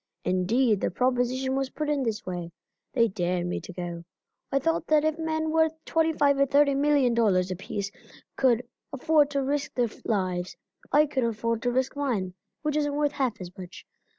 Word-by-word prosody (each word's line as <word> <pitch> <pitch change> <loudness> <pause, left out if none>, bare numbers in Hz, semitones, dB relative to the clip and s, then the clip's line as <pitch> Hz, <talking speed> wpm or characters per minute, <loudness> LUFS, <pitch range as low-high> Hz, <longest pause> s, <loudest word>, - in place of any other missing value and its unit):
Indeed 210 +4 +2
the - - +1
proposition 255 +4 0
was 270 -1 -1
put 305 +2 -4
in 295 -2 +1
this 225 -4 -2
way 175 -2 -5 0.4
they 230 -3 +4
dared 180 -3 -1
me 175 - -3
to - - -9
go. 175 -1 -6 0.5
I 275 - +2
thought 330 +4 0
that 305 -1 +3
if 315 +1 0
men 315 -1 -1
worth 320 0 +3
twenty 325 -1 +2
five 285 -3 +2
or 275 - +4
thirty 280 +1 +4
million 280 -3 +3
dollars 190 -6 +2
apiece 200 +2 -4 0.4
could 250 -2 +2 0.2
afford 295 +1 +3
to 280 -1 -1
risk 285 +2 -2
their 245 -2 +1
lives, 185 -4 -1 0.3
I 300 +1 +5
could 275 -3 -1
afford 230 0 -1
to 245 - 0
risk 260 +2 0
mine, 230 -11 -1 0.3
which 300 -1 0
isn't 290 -1 0
worth 295 -1 +1
half 260 -6 -1
as 180 -1 -9
much. 180 -1 -10
260 Hz, 185 wpm, -27 LUFS, 200-290 Hz, 0.5 s, I